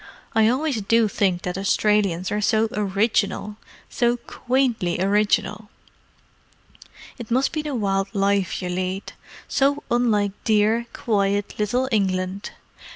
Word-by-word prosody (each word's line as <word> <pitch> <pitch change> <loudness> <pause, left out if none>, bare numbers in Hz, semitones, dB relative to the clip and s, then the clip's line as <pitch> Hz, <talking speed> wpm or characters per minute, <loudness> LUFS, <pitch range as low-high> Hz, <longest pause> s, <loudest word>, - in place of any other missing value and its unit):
I 220 -1 +4
always 260 0 0
do 225 +2 +3
think 190 -3 0
that 180 +1 -3
Australians 195 -3 +1
are 210 0 -1
so 220 +1 +2
original—so 210 +2 -1
quaintly 240 -8 -1
original. 210 +1 +1 1.5
It 235 - -8
must 255 +3 +2
be 310 - -2
the 300 -3 -4
wild 195 -3 0
life 195 -1 0
you 180 - -3
lead. 185 +2 -3 0.3
So 280 +1 +1
unlike 220 -4 +2
dear, 220 +2 +2
quiet 200 -2 0
little 245 +5 0
England. 190 -2 -1
210 Hz, 115 wpm, -23 LUFS, 195-235 Hz, 1.5 s, I